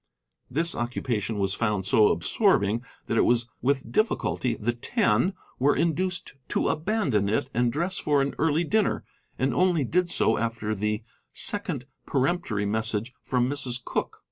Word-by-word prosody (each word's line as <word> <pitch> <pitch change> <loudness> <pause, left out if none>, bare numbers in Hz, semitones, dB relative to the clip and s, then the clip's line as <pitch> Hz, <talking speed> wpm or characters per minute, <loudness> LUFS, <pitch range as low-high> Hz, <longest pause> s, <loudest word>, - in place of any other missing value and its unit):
This 165 +6 0
occupation 120 -3 -2
was 100 -1 0
found 105 -4 0
so 105 +2 +5
absorbing 115 - +2 0.2
that 115 - -1
it - - +5
was 120 0 +2
with 130 -2 0
difficulty 130 - 0
the 115 +3 -1
Ten 120 - +1 0.3
were 140 +3 +4
induced 175 +2 -1 0.2
to - - +1
abandon 155 - +1
it 135 +5 0
and 120 0 +2
dress 170 +8 -1
for 145 -1 +2
an 140 0 0
early 160 +1 +2
dinner, 215 +5 +1 0.3
and 130 0 +1
only 175 +1 +3
did 175 +7 +1
so 110 - +2
after 115 -1 -2
the 105 +1 -1 0.3
second 180 - -2 0.2
peremptory 135 -7 0
message 110 +2 -1
from 125 -1 +1
Mrs. 130 -3 0
Cooke. - - -2
125 Hz, 150 wpm, -26 LUFS, 110-160 Hz, 0.3 s, so